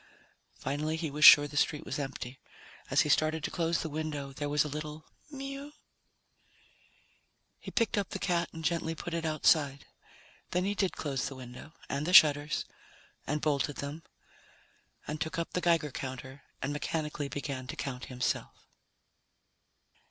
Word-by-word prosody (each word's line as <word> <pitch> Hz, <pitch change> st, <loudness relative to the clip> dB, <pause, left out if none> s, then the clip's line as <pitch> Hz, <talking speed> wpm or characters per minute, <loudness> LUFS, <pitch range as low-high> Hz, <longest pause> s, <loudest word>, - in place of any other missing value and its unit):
Finally 150 Hz, +4 st, -2 dB
he 160 Hz, -2 st, -3 dB
was 150 Hz, +2 st, -2 dB
sure 145 Hz, -1 st, +11 dB
the 145 Hz, -, -11 dB
street 150 Hz, 0 st, +1 dB
was -, -, -3 dB
empty. 135 Hz, -2 st, -5 dB, 0.5 s
As -, -, +4 dB
he -, -, 0 dB
started 155 Hz, +1 st, +2 dB
to -, -, -2 dB
close 170 Hz, -1 st, 0 dB
the -, -, -2 dB
window, 150 Hz, -2 st, -4 dB
there 145 Hz, +2 st, -3 dB
was 150 Hz, 0 st, +3 dB
a -, -, -4 dB
little 150 Hz, +1 st, -6 dB, 0.2 s
mew. 275 Hz, +1 st, -7 dB, 1.9 s
He -, -, -8 dB
picked 225 Hz, -2 st, +1 dB
up 200 Hz, -, -3 dB
the -, -, -4 dB
cat 175 Hz, -2 st, 0 dB
and 160 Hz, -1 st, -7 dB
gently 165 Hz, -1 st, 0 dB
put 175 Hz, +2 st, -6 dB
it 165 Hz, -1 st, -2 dB
outside. 150 Hz, -2 st, +2 dB, 0.6 s
Then 180 Hz, +1 st, 0 dB
he 200 Hz, -, +1 dB
did 195 Hz, -2 st, 0 dB
close 140 Hz, -4 st, -2 dB
the 140 Hz, -, -7 dB
window, 130 Hz, +4 st, -10 dB
and 140 Hz, +3 st, -2 dB
the 180 Hz, -, 0 dB
shutters, 150 Hz, -3 st, +6 dB, 0.6 s
and 150 Hz, +1 st, -1 dB
bolted 145 Hz, -2 st, +1 dB
them, 145 Hz, +3 st, -5 dB, 1.1 s
and 150 Hz, 0 st, -4 dB
took 160 Hz, -, -2 dB
up 170 Hz, -, -3 dB
the 180 Hz, -, 0 dB
Geiger 165 Hz, -4 st, +2 dB
counter, 130 Hz, +1 st, -6 dB, 0.2 s
and 140 Hz, +2 st, -1 dB
mechanically 150 Hz, -1 st, -2 dB
began 140 Hz, -2 st, -5 dB
to -, -, -5 dB
count 130 Hz, -2 st, -4 dB
himself. 125 Hz, -1 st, -3 dB
150 Hz, 160 wpm, -31 LUFS, 140-165 Hz, 1.9 s, sure